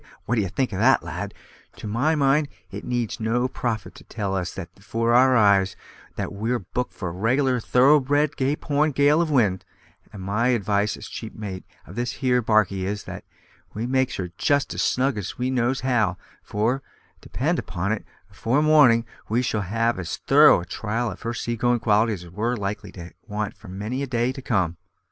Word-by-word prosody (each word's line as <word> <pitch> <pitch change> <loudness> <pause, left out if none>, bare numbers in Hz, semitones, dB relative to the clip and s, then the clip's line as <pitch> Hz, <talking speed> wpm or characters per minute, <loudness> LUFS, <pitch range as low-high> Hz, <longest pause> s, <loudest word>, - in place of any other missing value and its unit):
what 115 - -1
d'ye 105 -5 +1
think 120 +4 -2
of 95 - -3
that, 130 +5 +4
lad? - - -5 0.4
To - - -10
my 120 +10 +1
mind 145 +1 +3 0.2
it 100 +2 -7
needs 120 -3 -2
no 115 +3 +1
prophet 120 -3 -3
to - - -14
tell 100 -3 -3
us 90 0 -3
with 90 -3 -6
that - - -23
afore 115 +3 0
our 130 +1 +6
eyes 100 -3 +4 0.4
that - - -4
we're 115 +5 -1
booked 120 +4 -4
for 95 - -4
a - - -6
reg'lar 125 +7 +1
thorough 130 +6 +5
bred 145 +2 +1
Cape 140 +3 -1
Horn 150 +1 +2
gale 145 +4 +4
of 170 - 0
wind; 105 -10 +2 0.5
and 100 -3 -9
my 105 +5 0
advice 105 -3 +1
as 105 - -9
chief 110 - -8
mate 100 -4 -6 0.2
of 90 - -11
this 120 -1 -2
here 125 +1 +1
barkie 105 -4 +2
is, 100 +2 -3
that - - -8 0.5
we 110 +3 -2
makes 130 0 +1
her 90 -2 -4
just 145 -1 +1
as - - -2
snug 130 -3 +1
as 100 - -6
we 125 +1 -1
knows 125 +1 0
how, 110 -8 +1 0.2
for, 115 +6 -1 0.4
depend - - -1
upon 95 +4 -3
it, 110 - -2 0.3
afore 130 +6 +1
morning 140 -7 +5 0.2
we 120 +3 +1
shall 110 -3 -1
have 115 +3 0
as 85 -2 -4
thorough - - +6
a - - -8
trial 115 +6 -2
of 90 - -10
her 115 +1 -3
seagoin' 120 +2 0
qualities 110 -3 +2
as 85 - -13
we're 115 +6 -1
likely 100 0 -4
to 85 -1 -9 0.2
want 105 0 -3
for 110 - -15
many 105 +8 -4
a 140 - -2
day 120 0 0
to 135 - -8
come." 95 -9 0
115 Hz, 200 wpm, -24 LUFS, 100-130 Hz, 0.5 s, our